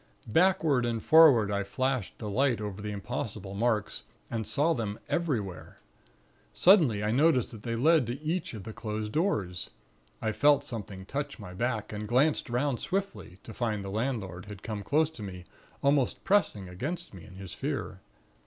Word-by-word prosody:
"Backward 160 Hz, -, +3 dB
and 120 Hz, -1 st, 0 dB
forward 135 Hz, -7 st, +6 dB
I 100 Hz, 0 st, 0 dB
flashed 130 Hz, +2 st, -2 dB
the 110 Hz, -, -6 dB
light 120 Hz, +2 st, +2 dB
over 105 Hz, -1 st, -5 dB
the 105 Hz, -, -4 dB
impossible 100 Hz, -1 st, -5 dB
marks 110 Hz, 0 st, 0 dB, 0.3 s
and 115 Hz, -3 st, -2 dB
saw 155 Hz, +3 st, +2 dB
them 110 Hz, -6 st, -3 dB
everywhere. 115 Hz, -, -2 dB, 0.8 s
Suddenly 155 Hz, -, +5 dB
I 105 Hz, -, +1 dB
noticed 140 Hz, 0 st, +3 dB
that 110 Hz, -3 st, -10 dB
they 115 Hz, +1 st, -3 dB
led 150 Hz, +1 st, +4 dB
to 120 Hz, +3 st, -4 dB
each 160 Hz, -3 st, -2 dB
of 105 Hz, -, -7 dB
the 110 Hz, -, -7 dB
closed 105 Hz, -1 st, -4 dB
doors. 105 Hz, -, -1 dB, 0.5 s
I 110 Hz, -, -1 dB
felt 145 Hz, +4 st, +4 dB
something 105 Hz, -8 st, -7 dB
touch 140 Hz, +6 st, -4 dB
my 95 Hz, -5 st, -9 dB
back, 110 Hz, +1 st, -2 dB
and 105 Hz, 0 st, -4 dB
glanced 135 Hz, +4 st, +2 dB
'round 125 Hz, +1 st, 0 dB
swiftly, 195 Hz, -, -3 dB
to 110 Hz, -, -9 dB
find 110 Hz, -3 st, -2 dB
the 95 Hz, -, -5 dB
landlord 105 Hz, -6 st, -3 dB
had 100 Hz, -1 st, -10 dB
come 105 Hz, -2 st, -4 dB
close 155 Hz, +8 st, +2 dB
to 140 Hz, -, -11 dB
me, 90 Hz, -3 st, -7 dB, 0.4 s
almost 140 Hz, -2 st, +2 dB
pressing 175 Hz, -, +2 dB
against 145 Hz, -, -5 dB
me, 90 Hz, -4 st, -11 dB
in 95 Hz, -, -13 dB
his 95 Hz, -2 st, -8 dB
fear. -, -, -4 dB
115 Hz, 170 wpm, -29 LUFS, 105-145 Hz, 0.8 s, forward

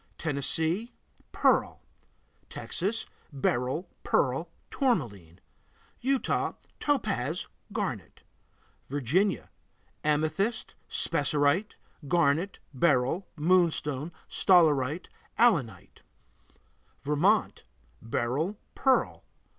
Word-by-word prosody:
Tennessee 160 Hz, -, -1 dB, 0.4 s
Pearl. -, -, +2 dB, 0.7 s
Texas 205 Hz, +6 st, -3 dB, 0.3 s
Beryl, 135 Hz, +4 st, -1 dB, 0.2 s
pearl, 140 Hz, +6 st, +1 dB, 0.2 s
tourmaline. 115 Hz, -, -1 dB, 0.6 s
Utah 270 Hz, +1 st, 0 dB, 0.3 s
Topaz, 195 Hz, -, -1 dB, 0.3 s
garnet. 190 Hz, -, -4 dB, 0.7 s
Virginia 145 Hz, -, 0 dB, 0.5 s
Amethyst, 155 Hz, +9 st, 0 dB, 0.2 s
spessarite, 145 Hz, +5 st, +2 dB, 0.3 s
garnet, 170 Hz, +4 st, +2 dB, 0.2 s
beryl, 140 Hz, +5 st, +2 dB
moonstone, 160 Hz, -3 st, +1 dB, 0.2 s
staurolite, 155 Hz, -4 st, +3 dB, 0.3 s
allanite. 120 Hz, -, +1 dB, 1.0 s
Vermont 165 Hz, +10 st, +2 dB, 0.4 s
Beryl, 135 Hz, -, -1 dB, 0.2 s
pearl. 265 Hz, -1 st, +1 dB
160 Hz, 60 wpm, -28 LUFS, 135-195 Hz, 1.0 s, staurolite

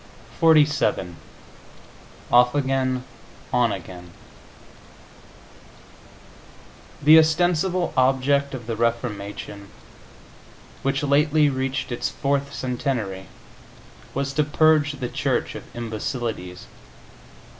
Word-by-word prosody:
XLVII 150 Hz, -, +3 dB, 1.2 s
OFF 125 Hz, +2 st, +5 dB
AGAIN, 130 Hz, -2 st, 0 dB, 0.5 s
ON 125 Hz, -1 st, +3 dB
AGAIN 90 Hz, -1 st, -8 dB, 2.9 s
The 155 Hz, +2 st, +8 dB
ostensible 175 Hz, +2 st, +1 dB
object 135 Hz, +2 st, +2 dB
of 120 Hz, -3 st, -8 dB
the 115 Hz, -1 st, -3 dB
Reformation, 105 Hz, -3 st, -3 dB, 1.1 s
which 135 Hz, +1 st, -1 dB
lately 150 Hz, +1 st, +3 dB
reached 130 Hz, 0 st, -3 dB
its 120 Hz, -, -2 dB
fourth 140 Hz, 0 st, -1 dB
centenary, 120 Hz, -8 st, -3 dB, 0.9 s
was 140 Hz, 0 st, -2 dB
to 150 Hz, -, +2 dB
purge 150 Hz, 0 st, +3 dB
the 130 Hz, -3 st, -4 dB
Church -, -, -1 dB
of -, -, -9 dB
imbecilities. 110 Hz, -5 st, -5 dB
130 Hz, 80 wpm, -23 LUFS, 115-145 Hz, 2.9 s, The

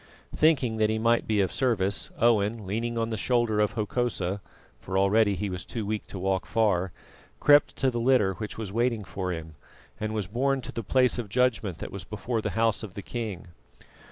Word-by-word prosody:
Thinking 130 Hz, -8 st, +3 dB
that 110 Hz, -1 st, +2 dB
he 110 Hz, -, 0 dB
might 115 Hz, +1 st, +2 dB
be 105 Hz, -2 st, +2 dB
of 95 Hz, -, 0 dB
service, 105 Hz, -7 st, 0 dB
Owen, 110 Hz, -2 st, +2 dB
leaning 115 Hz, +4 st, -2 dB
on 115 Hz, 0 st, -1 dB
the 110 Hz, -, -2 dB
shoulder 120 Hz, -2 st, +1 dB
of 105 Hz, +1 st, +2 dB
Hokosa, 105 Hz, -4 st, -1 dB, 0.4 s
for 95 Hz, 0 st, -3 dB
already 100 Hz, +1 st, +4 dB
he 100 Hz, +3 st, -2 dB
was 90 Hz, -2 st, -4 dB
too 115 Hz, -3 st, -5 dB
weak 105 Hz, +1 st, -3 dB
to -, -, -7 dB
walk 95 Hz, 0 st, -1 dB
far, 100 Hz, -5 st, +1 dB, 0.5 s
crept 145 Hz, 0 st, +5 dB
to 135 Hz, -1 st, +1 dB
the 120 Hz, -, -2 dB
litter 115 Hz, -6 st, +3 dB
which 105 Hz, +2 st, -6 dB
was 105 Hz, -3 st, -5 dB
waiting 115 Hz, -1 st, +1 dB
for 95 Hz, -1 st, -4 dB
him, 80 Hz, -2 st, -6 dB, 0.5 s
and 110 Hz, 0 st, -3 dB
was 105 Hz, -3 st, -1 dB
borne 135 Hz, +8 st, 0 dB
to -, -, -7 dB
the 115 Hz, -, -4 dB
place 125 Hz, +4 st, +2 dB
of 115 Hz, -4 st, -4 dB
judgment 115 Hz, -6 st, +1 dB
that -, -, -7 dB
was 100 Hz, -3 st, -6 dB
before 110 Hz, +4 st, -3 dB
the -, -, -2 dB
house 115 Hz, -2 st, +2 dB
of 100 Hz, -5 st, -8 dB
the 100 Hz, -, -6 dB
king. 105 Hz, -7 st, -5 dB
110 Hz, 205 wpm, -27 LUFS, 100-120 Hz, 0.5 s, crept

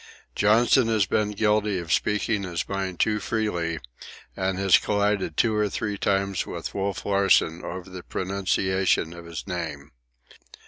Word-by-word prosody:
Johnson 115 Hz, +4 st, +4 dB
has 110 Hz, -4 st, +2 dB
been 105 Hz, +2 st, 0 dB
guilty 105 Hz, -1 st, +1 dB
of 85 Hz, -1 st, -2 dB
speaking 105 Hz, +1 st, +1 dB
his 90 Hz, -3 st, -3 dB
mind 95 Hz, -3 st, -3 dB
too 105 Hz, 0 st, +2 dB
freely, 90 Hz, -8 st, -1 dB, 0.6 s
and 95 Hz, 0 st, -1 dB
has 95 Hz, -2 st, +5 dB
collided 100 Hz, -5 st, 0 dB
two 115 Hz, -2 st, +3 dB
or 105 Hz, -1 st, +1 dB
three 105 Hz, +1 st, -3 dB
times 100 Hz, -1 st, 0 dB
with -, -, -5 dB
Wolf 100 Hz, -1 st, -3 dB
Larsen 95 Hz, -4 st, +3 dB
over 90 Hz, +1 st, -6 dB
the 90 Hz, -1 st, -8 dB
pronunciation 95 Hz, -2 st, 0 dB
of 85 Hz, -1 st, -10 dB
his 85 Hz, -1 st, -7 dB
name. 80 Hz, -6 st, -5 dB
95 Hz, 145 wpm, -25 LUFS, 90-105 Hz, 0.6 s, has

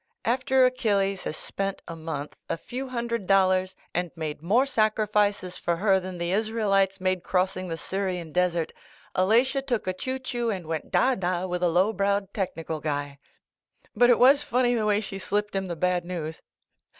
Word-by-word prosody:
After 255 Hz, +2 st, +3 dB
Achilles 200 Hz, -6 st, +1 dB
has 155 Hz, -, -3 dB
spent 195 Hz, 0 st, -4 dB
a 165 Hz, -, -6 dB
month, 155 Hz, -3 st, -5 dB
a -, -, -1 dB
few 255 Hz, +10 st, -6 dB
hundred 235 Hz, -5 st, -3 dB
dollars, 185 Hz, -1 st, +3 dB, 0.2 s
and 175 Hz, 0 st, -1 dB
made 155 Hz, -3 st, -4 dB
more 220 Hz, +11 st, +3 dB
sacrifices 210 Hz, -5 st, +1 dB
for 170 Hz, -, 0 dB
her 190 Hz, +2 st, +3 dB
than 185 Hz, -1 st, -7 dB
the 170 Hz, 0 st, -2 dB
Israelites 200 Hz, -2 st, +1 dB
made 185 Hz, -1 st, 0 dB
crossing 185 Hz, 0 st, 0 dB
the 165 Hz, -1 st, -4 dB
Syrian 185 Hz, -3 st, -3 dB
desert. 175 Hz, -1 st, 0 dB, 0.4 s
Alatia 240 Hz, +9 st, +3 dB
took 240 Hz, -6 st, -1 dB
a 185 Hz, -, -1 dB
choo 260 Hz, +8 st, -3 dB
choo 245 Hz, -3 st, -2 dB
and 190 Hz, -5 st, -3 dB
went 160 Hz, -1 st, -4 dB
da 265 Hz, -, +3 dB
da 180 Hz, -4 st, -1 dB
with 180 Hz, -1 st, -3 dB
a 175 Hz, -, +3 dB
low 185 Hz, +6 st, +3 dB
browed 200 Hz, 0 st, 0 dB
tech 195 Hz, -3 st, -2 dB
nical 160 Hz, -1 st, -5 dB
guy. 145 Hz, -2 st, -3 dB, 0.8 s
But 245 Hz, +3 st, +5 dB
it 245 Hz, -, +6 dB
was 275 Hz, +3 st, +6 dB
funny 245 Hz, -3 st, +1 dB
the 220 Hz, -3 st, 0 dB
way 210 Hz, 0 st, +2 dB
she 195 Hz, -2 st, -6 dB
slipped 205 Hz, +1 st, -2 dB
him 195 Hz, -1 st, -1 dB
the 170 Hz, -, -3 dB
bad 180 Hz, +1 st, +1 dB
news 165 Hz, -3 st, -5 dB
195 Hz, 185 wpm, -26 LUFS, 180-220 Hz, 0.8 s, it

